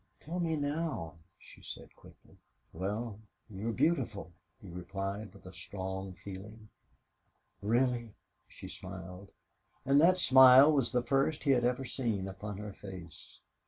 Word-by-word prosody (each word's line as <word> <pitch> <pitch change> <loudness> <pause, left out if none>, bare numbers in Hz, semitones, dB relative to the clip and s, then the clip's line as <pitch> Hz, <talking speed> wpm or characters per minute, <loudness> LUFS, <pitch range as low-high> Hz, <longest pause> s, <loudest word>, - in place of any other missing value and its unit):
"Tell 170 +4 -4
me 165 -2 0
now," 145 - -2 0.2
she - - -16
said, - - -9
quickly. - - -19 0.4
"Well, 105 +5 -3 0.3
you're 105 +4 -3
beautiful," 110 - 0 0.3
he 100 - -13
replied, 95 +4 -5
with 90 - -13
strong 95 +1 -5
feeling. 105 +4 -10 0.9
"Really?" 120 +1 +1 0.3
she - - -10
smiled, 95 +1 -9 0.5
and 140 +2 +5
that 180 +3 +6
smile 130 -2 +8
was 135 -6 +2
the 125 -1 +1
first 140 +4 +1
he 140 - +3
had 125 -2 +3
ever 125 +2 0
seen 115 -6 -2
upon 95 +1 -6
her 105 -1 -6
face. 90 -5 -11
105 Hz, 130 wpm, -32 LUFS, 95-135 Hz, 0.9 s, smile